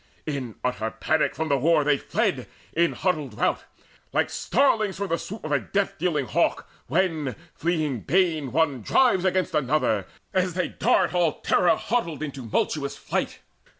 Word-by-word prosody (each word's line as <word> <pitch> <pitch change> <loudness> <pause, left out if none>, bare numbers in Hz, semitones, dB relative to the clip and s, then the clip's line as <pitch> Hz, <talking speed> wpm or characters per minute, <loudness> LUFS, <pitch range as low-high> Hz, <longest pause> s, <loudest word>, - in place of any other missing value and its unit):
In 135 -7 -4
utter 110 -3 -1
panic 155 +6 0
from 160 0 -2
the 140 -1 +2
war 155 +2 +3
they 145 -1 +2
fled, - - -1 0.3
In 170 +1 +2
huddled 150 - -1
rout, - - 0 0.5
like - - +1
starlings 215 -8 +1
from 200 -1 -3
the 165 - 0
swoop 210 +3 -7
Of 155 - -4
a 145 - +3
death 200 +6 -2
dealing 155 -5 0
hawk, - - 0 0.2
when, 155 - 0 0.2
fleeing 155 -5 -1
bane, 160 - +1
One 145 -3 +1
drives 190 - +3
against 185 0 +1
another, 130 -8 +1 0.3
as 185 -2 +1
they 180 - 0
dart - - +2
All 175 -3 +2
terror 175 -2 +3
huddled 170 - -2
in 150 - -3
tumultuous 140 +3 -2
flight. - - -3
155 Hz, 160 wpm, -25 LUFS, 140-180 Hz, 0.5 s, war